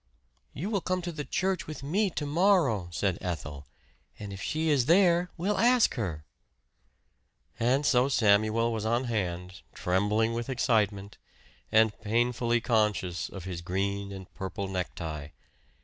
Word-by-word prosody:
"You 190 +10 -4
will 200 -3 0
come 185 +1 -2
to 165 -4 -4
church 185 +3 -1
with 155 -2 -7
me 195 +8 +1
to 155 -4 -4
morrow," 150 - +2
said 95 +1 -1
Ethel. 75 -5 -5 0.5
"And 100 -1 -7
if 95 - -8
she 155 +1 -1
is 135 -5 +2
there 175 0 +4
we'll 195 +4 0
ask 245 0 +4
her." 85 - -4 1.3
And 130 +5 +2
so 130 -2 +3
Samuel 110 0 +3
was 110 -2 -3
on 120 +3 +1
hand, 90 -6 -3
trembling 105 +5 +1
with 120 +2 -4
excitement, 105 -5 0 0.5
and 110 -1 +4
painfully 120 +2 +1
conscious 105 -7 0
of 95 - -8
his 90 -2 -5
green 100 +3 -2
and 95 -2 -8
purple 95 +1 -5
necktie. 85 -5 -4
110 Hz, 140 wpm, -28 LUFS, 95-150 Hz, 1.3 s, there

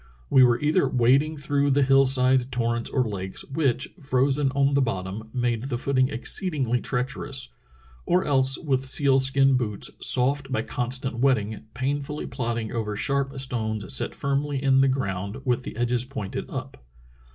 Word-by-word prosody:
We 130 - +7
were 120 -1 +4
either 150 -1 +2
wading 135 +6 +2
through 140 0 0
the 140 +1 +3
hill 135 +1 +5
side 130 -1 +3
torrents 120 -1 -1
or 130 -4 0
lakes, 95 -3 -5
which, 135 -1 0
frozen 135 0 +1
on 140 0 +2
the 140 - +3
bottom, 105 -2 -4
made 120 -1 -1
the 130 -3 -2
footing 130 0 +1
exceedingly 130 -3 -1
treacher 135 +3 -3
ous, 130 -2 -3 0.6
or 180 +2 +2
else 135 -2 +3
with 135 -3 -1
seal 135 -1 +4
skin 135 0 +3
boots, 105 -5 -2
soft 135 +2 +2
by 110 -4 0
constant 125 0 -2
wet 135 0 +4
ting, 105 +1 -6
painfully 140 +3 -3
plodding 115 -3 -3
over 110 -3 -3
sharp 135 +3 -1
stones 110 -3 -1
set - - 0
firmly 140 0 -2
in 135 -1 +4
the 135 - +4
ground 100 -6 -2
with 125 -1 +1
the 125 - -8
edges 120 0 +1
pointed 125 -7 -6
up. - - -7
130 Hz, 165 wpm, -25 LUFS, 120-140 Hz, 0.6 s, We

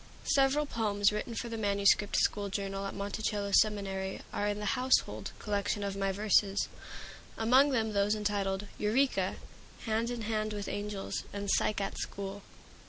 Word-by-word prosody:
Several 280 +2 +3
poems 210 -6 +1
written 210 +2 -4
for 235 - -3
the 230 -1 -4
manuscript 200 0 +3
school 205 -1 +1
journal 195 0 -3
at - - -6
Monticello 200 0 -2
Seminary 195 -2 +1
are 205 - 0
in 205 0 -1
the 210 -1 -1
"Household" 255 0 +1
collection 205 0 -1
of 200 -1 -2
my 195 0 0
verses, 205 0 +2 0.7
among 255 +6 +5
them 220 -5 0
those 205 +1 +2
entitled 205 -2 -1
"Eureka," 255 +6 +1 0.5
"Hand 225 +1 0
in 240 -1 -4
Hand 215 0 -1
with 205 -1 -4
Angels," 205 -1 -3
and 200 0 -2
"Psyche 210 -1 +1
at 195 - -4
School." 200 0 -5
205 Hz, 155 wpm, -31 LUFS, 200-220 Hz, 0.7 s, among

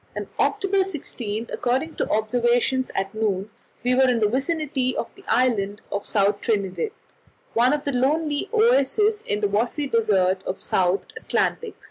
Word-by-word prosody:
On - - -4
October 395 -1 +2
16, 235 - -4
according 265 +6 -1
to - - 0
the - - -6
observations 240 +4 +1
at 195 +2 -2
noon, 210 -2 -1 0.3
we 250 +1 +2
were 260 0 +4
in 245 - +2
the 215 -2 +3
vicinity 270 0 -1
of 230 - -4
the - - -16
island 215 -5 +1
of 200 - -3
South 205 0 +1
Trinidad, 200 - -1 0.6
one 245 +3 +4
of 295 -1 0
the 285 - -1
lonely 295 +6 0
oases 430 - +3
in 205 +1 -1
the 205 - +3
watery 235 +8 0
desert 195 -7 +2
of 185 - -1
the - - -20
South 185 +1 +1
Atlantic. 450 0 -1
245 Hz, 165 wpm, -23 LUFS, 210-295 Hz, 0.6 s, were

